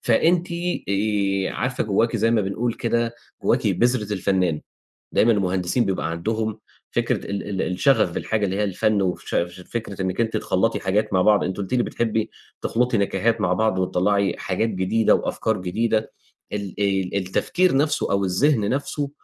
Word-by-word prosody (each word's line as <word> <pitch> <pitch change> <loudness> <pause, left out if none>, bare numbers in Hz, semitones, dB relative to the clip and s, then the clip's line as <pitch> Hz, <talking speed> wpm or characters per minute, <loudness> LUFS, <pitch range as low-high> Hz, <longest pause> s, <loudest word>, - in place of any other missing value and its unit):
فأنتِ 170 +9 +2 0.4
آآ 100 -1 0
عارفة 125 0 -2
جوّاكِ 110 +3 +1
زي 115 +1 +2
ما 115 - +3
بنقول 110 +4 -1
كده، 115 0 -1 0.3
جوّاكِ - - +2
بذرة 120 -4 +1
الفنان، 95 -5 +1 0.5
دايمًا 115 +2 +4
المهندسين 95 +2 +1
بيبقى 80 -4 -1
عندهم 110 +5 -2 0.3
فكرة - - 0
ال 100 0 -3
ال 95 -2 -2
الشغف 90 0 +2
بالحاجة 105 +3 -1
اللي 95 0 -2
هي 105 - 0
الفن، 100 +1 +1
وفش 95 -2 -2 0.4
فكرة 105 -4 -4
إنِّك 95 +3 -1
أنتِ 115 -1 0
تخلّطي - - 0
حاجات 100 +2 0
مع 95 - +4
بعض، 105 +2 +4
أنتِ 95 - -3
قُلتِ 100 +4 -4
لي 120 - +3
بتحبي 110 -2 -1 0.3
تخلطي 125 0 +1
نكهات 105 +3 +1
مع 90 -2 +2
بعض، 100 0 +1
وتطلّعي 95 +2 +1
حاجات 105 +4 -1
جديدة، 105 +3 +2
وأفكار 110 -1 -1
جديدة، 110 +4 0 0.4
ال 100 -3 -4
ال 95 -2 0
التفكير 135 - +1
نَفْسه 150 -5 +1
أو 100 0 +2
الذِهن 105 +3 +2
نَفْسه 140 +1 -2
105 Hz, 160 wpm, -23 LUFS, 95-115 Hz, 0.5 s, دايمًا